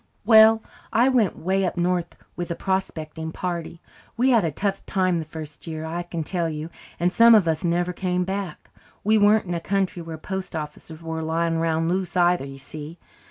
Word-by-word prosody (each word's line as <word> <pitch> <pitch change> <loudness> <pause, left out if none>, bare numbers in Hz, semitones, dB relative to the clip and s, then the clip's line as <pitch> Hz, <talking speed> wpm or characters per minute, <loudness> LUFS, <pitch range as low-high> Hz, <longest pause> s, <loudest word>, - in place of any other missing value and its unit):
"Well, 220 0 +7 0.3
I 240 +4 +4
went 235 -8 +2
way 190 +3 0
up 180 - -2
north 175 -1 0 0.2
with 175 -1 -4
a 170 - -2
prospecting 160 -5 -3
party. 170 -1 -4 0.4
We 255 +3 +3
had 230 -5 +4
a 165 - +1
tough 195 +6 -2
time 185 -3 +1
the - - -3
first 155 -1 -9
year, 160 -1 -5
I 165 +2 -3
can 170 -2 -4
tell 170 0 -1
you, 155 +1 -5 0.3
and 175 +1 +2
some 230 +4 +7
of 200 -6 +4
us 160 +1 0
never 175 +1 0
came 180 0 -1
back. 190 -3 -5 0.3
We 215 +1 +4
weren't 210 +1 +4
in 175 - -3
a 170 - -1
country 190 -1 -1
where 165 -1 -7
post 190 +2 -5
offices 155 +1 -7
were 160 0 -4
lying 165 +1 0
round 165 0 +1
loose 185 +1 -1
either, 175 -4 +3
you 135 0 -9
see. 150 +4 -9
175 Hz, 200 wpm, -24 LUFS, 160-190 Hz, 0.4 s, Well